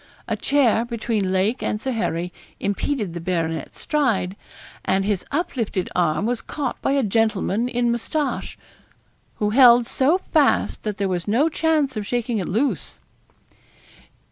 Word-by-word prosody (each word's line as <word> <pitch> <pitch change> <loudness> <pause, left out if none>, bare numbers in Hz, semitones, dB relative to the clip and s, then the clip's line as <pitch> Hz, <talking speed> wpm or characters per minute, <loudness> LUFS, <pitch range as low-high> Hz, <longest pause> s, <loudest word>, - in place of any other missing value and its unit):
A - - 0
chair 260 -5 +2
between 225 -4 -2
Lake 195 +6 +1
and 210 - -1
Sir 260 +4 -3
Harry 180 -7 -2 0.3
impeded 205 -1 -2
the 170 - -5
baronet's 165 -2 -2
stride, 230 - 0 0.5
and 190 +1 +1
his 200 -3 0
uplifted 240 - -2
arm 175 +2 +1
was 240 0 -1
caught 280 -4 -4
by 275 - +1
a 280 -1 +2
gentleman 220 +1 +1
in 240 -1 +1
moustache, 275 +5 -2 0.8
who 210 -1 0
held 245 -1 +7
so 275 +9 +2
fast 310 -6 +1
that 210 -2 -4
there 200 - 0
was 180 -1 -2
no 255 +10 +3
chance 305 -4 +1
of 210 -1 -4
shaking 240 -2 -1
it 185 - -3
loose. 245 +9 -1
225 Hz, 145 wpm, -22 LUFS, 195-265 Hz, 0.8 s, held